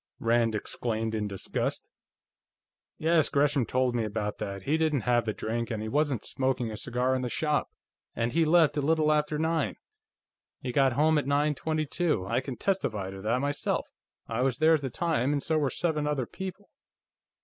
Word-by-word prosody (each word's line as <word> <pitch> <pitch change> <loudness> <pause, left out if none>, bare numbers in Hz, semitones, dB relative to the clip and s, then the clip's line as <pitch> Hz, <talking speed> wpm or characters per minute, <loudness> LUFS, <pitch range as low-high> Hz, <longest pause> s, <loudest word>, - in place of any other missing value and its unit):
Rand 115 -1 +2
exclaimed 110 +1 -2
in 105 -1 -1
disgust. 100 -2 -3 1.1
"Yes, 160 -1 +3
Gresham 140 -4 +2
told 130 0 +1
me 120 -2 0
about 105 -1 -3
that. 100 -1 -5
He 150 - +1
didn't 155 -4 +1
have 120 +1 +2
the 110 - 0
drink, 115 +2 -3
and 110 -3 -2
he 110 - -4
wasn't 140 -2 0
smoking 130 -3 -1
a - - -5
cigar 125 +3 0
in 130 - 0
the 125 - -2
shop, 150 +3 0 0.5
and 115 +1 0
he 165 +4 +3
left 160 -2 +4
a - - +2
little 155 +1 +2
after 150 0 +1
nine. 160 -1 0 0.8
He 125 - -4
got 135 0 +3
home 155 +3 +3
at 140 - -4
nine 145 +1 +2
twenty 155 +2 -1
two. 150 - 0
I 115 +5 0
can 130 -2 -6
testify 110 - -1
to 95 0 -8
that, 115 +5 +1
myself; 145 0 -1 0.4
I 115 +1 -2
was 130 -1 +1
there 160 +1 +5
at 155 - +2
the 135 - -3
time, 145 -1 0
and 145 -2 -1
so 160 -1 +1
were 145 -3 +1
seven 150 0 -1
other 145 -4 0
people." 190 - -8
135 Hz, 195 wpm, -28 LUFS, 115-155 Hz, 1.1 s, there